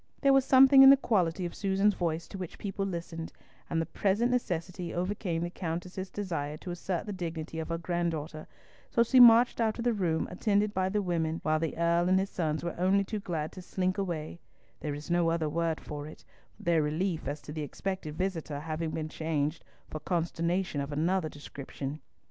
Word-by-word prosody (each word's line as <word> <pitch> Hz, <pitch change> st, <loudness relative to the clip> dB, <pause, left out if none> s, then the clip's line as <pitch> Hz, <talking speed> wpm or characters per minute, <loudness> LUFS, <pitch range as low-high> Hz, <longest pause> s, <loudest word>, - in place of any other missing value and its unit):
There 275 Hz, -1 st, +5 dB
was 270 Hz, -1 st, +4 dB
something 270 Hz, +1 st, +8 dB
in 270 Hz, -, +11 dB
the 275 Hz, -, +9 dB
quality 185 Hz, -8 st, +1 dB
of 175 Hz, -, -5 dB
Susan's 195 Hz, +1 st, +2 dB
voice 165 Hz, -2 st, -2 dB
to 195 Hz, -, -7 dB
which 180 Hz, -3 st, -6 dB
people 195 Hz, -1 st, -3 dB
listened, 170 Hz, -2 st, -5 dB, 0.4 s
and 165 Hz, -, 0 dB
the 165 Hz, -, 0 dB
present 210 Hz, +8 st, +1 dB
necessity 180 Hz, -6 st, -2 dB
overcame 180 Hz, -2 st, -2 dB
the 175 Hz, -, -3 dB
Countess's 180 Hz, +2 st, -4 dB
desire 165 Hz, -7 st, -3 dB
to 175 Hz, -, -7 dB
assert 175 Hz, 0 st, -3 dB
the 210 Hz, -, -4 dB
dignity 165 Hz, -3 st, -5 dB
of 160 Hz, -, -5 dB
her 165 Hz, -, -1 dB
granddaughter, 165 Hz, -3 st, -3 dB, 0.4 s
so 235 Hz, -, +3 dB
she 255 Hz, +2 st, +4 dB
marched 240 Hz, 0 st, +7 dB
out 220 Hz, -1 st, +1 dB
of 235 Hz, -, -3 dB
the 240 Hz, -1 st, +2 dB
room 175 Hz, -6 st, 0 dB
attended 205 Hz, +2 st, +1 dB
by 185 Hz, -1 st, 0 dB
the 205 Hz, +1 st, 0 dB
women, 165 Hz, -2 st, -1 dB
while 155 Hz, 0 st, +2 dB
the 160 Hz, -1 st, -3 dB
Earl 170 Hz, +1 st, +2 dB
and 185 Hz, -, +5 dB
his 195 Hz, +1 st, -1 dB
sons 155 Hz, -3 st, -1 dB
were 170 Hz, -, -2 dB
only 190 Hz, +2 st, +3 dB
too 210 Hz, +2 st, -4 dB
glad 160 Hz, -6 st, -3 dB
to 185 Hz, -, -9 dB
slink 185 Hz, +1 st, -1 dB
away—there 160 Hz, -4 st, -6 dB
is 150 Hz, +3 st, -7 dB
no 175 Hz, -1 st, +3 dB
other 165 Hz, -1 st, 0 dB
word 165 Hz, +1 st, -1 dB
for 145 Hz, 0 st, -7 dB
it, 155 Hz, -, -13 dB, 0.3 s
their 170 Hz, -2 st, +2 dB
relief 160 Hz, +3 st, -1 dB
as 145 Hz, +1 st, -3 dB
to 150 Hz, -, -8 dB
the 155 Hz, 0 st, -4 dB
expected 155 Hz, +1 st, -4 dB
visitor 165 Hz, -5 st, -3 dB
having 160 Hz, +1 st, -3 dB
been 155 Hz, 0 st, -3 dB
exchanged 155 Hz, -1 st, -2 dB, 0.2 s
for 155 Hz, -, -6 dB
consternation 170 Hz, 0 st, -1 dB
of 140 Hz, +1 st, -5 dB
another 165 Hz, +3 st, 0 dB
description. 145 Hz, 0 st, -7 dB
170 Hz, 195 wpm, -30 LUFS, 160-195 Hz, 0.4 s, in